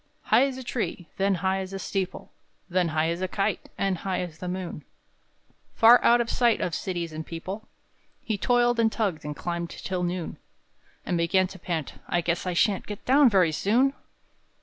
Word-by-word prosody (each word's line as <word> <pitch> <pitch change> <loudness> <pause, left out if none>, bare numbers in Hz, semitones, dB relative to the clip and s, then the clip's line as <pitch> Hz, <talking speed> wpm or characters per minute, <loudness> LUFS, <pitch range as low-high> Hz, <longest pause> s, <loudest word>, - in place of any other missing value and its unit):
_" - - -42 0.3
High 270 - +5
as 265 -2 -5
a 260 - -7
tree, 215 - -4
then 195 0 +2
high 190 +1 +2
as 190 0 -6
a - - -3
steeple, 190 -1 -4 0.4
Then 180 0 +1
high 160 0 +1
as 170 +2 -3
a 185 - 0
kite, 200 +2 -2
and 195 -3 0
high 190 -2 -2
as 165 -3 -7
the 180 - -5
moon, 180 -4 -5 0.9
Far 235 +2 +7
out 240 +1 +6
of 235 - 0
sight 235 -1 +2
of 175 - -2
cities 170 -2 -3
and 155 +1 -5
people, 185 +7 -7 0.5
He 220 - -2
toiled 240 +3 +2
and 225 -1 +3
tugged 195 -10 -1
and 150 0 -5
climbed 170 +1 -3
till 185 -2 -4
noon; 175 -1 -3 0.7
And 175 - 0
began 185 +3 +3
to 190 - -11
pant: 165 -3 -4
"I 175 - +1
guess 170 +2 -1
I 180 - 0
shan't 195 +3 +1
Get 205 -1 -7
down 270 +1 +6
very 185 -6 +4
soon!" 240 - +2
185 Hz, 195 wpm, -26 LUFS, 170-220 Hz, 0.9 s, Far